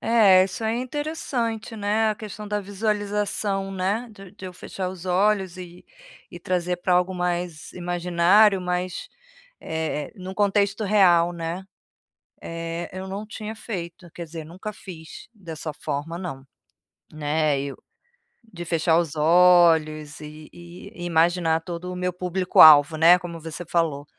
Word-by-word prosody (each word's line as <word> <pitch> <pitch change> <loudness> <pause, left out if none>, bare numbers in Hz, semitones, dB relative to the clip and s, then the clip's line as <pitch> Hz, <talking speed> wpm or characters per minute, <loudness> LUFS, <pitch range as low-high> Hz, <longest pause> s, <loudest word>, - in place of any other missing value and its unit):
É, 205 -5 +5
isso 195 +4 -4
é 220 +1 0
interessante, 250 -5 -3
né, 215 +2 +1
a - - -2
questão 210 0 -8
da 210 0 -1
visualização 205 -1 -2
né, 195 +6 -2
de 195 -3 -14
de - - -13
eu 180 - -8
fechar 185 +1 -6
os 185 0 -9
olhos 190 0 +1
e 180 -1 -11 0.4
e - - -11
trazer 180 -2 -1
para 180 +1 0
algo 180 +1 +1
mais 175 -3 -3
imaginário, 180 +3 +3
mas, 180 0 -3 0.5
eh, 160 -2 -3
num 190 0 -8
contexto 205 +1 +1
real, 180 -4 +4
né, 170 +2 -5 0.8
eh, 165 +1 -5
eu 185 +1 -7
não 200 +3 -6
tinha 215 +1 -7
feito, 175 -5 -7
quer 170 - -6
dizer 160 -1 -8
nunca 190 +6 -7
fiz 165 -3 -11
dessa 160 -6 -7
forma 150 +4 -4
não, 135 -7 -7 0.7
né, 150 -1 0
eu, 140 0 -5 0.8
de 175 - -6
fechar 165 0 +2
os 160 -3 -3
olhos 160 -2 +4
e 150 0 -11
e 175 +3 -11
imaginar 165 -1 +2
todo 180 +1 -6
o - - -6
meu 180 0 -2
público-alvo 170 -4 +6
né 170 +3 +7
como 170 -2 -8
você 165 +2 -7
falou. 155 -4 -1
180 Hz, 145 wpm, -24 LUFS, 165-200 Hz, 0.8 s, né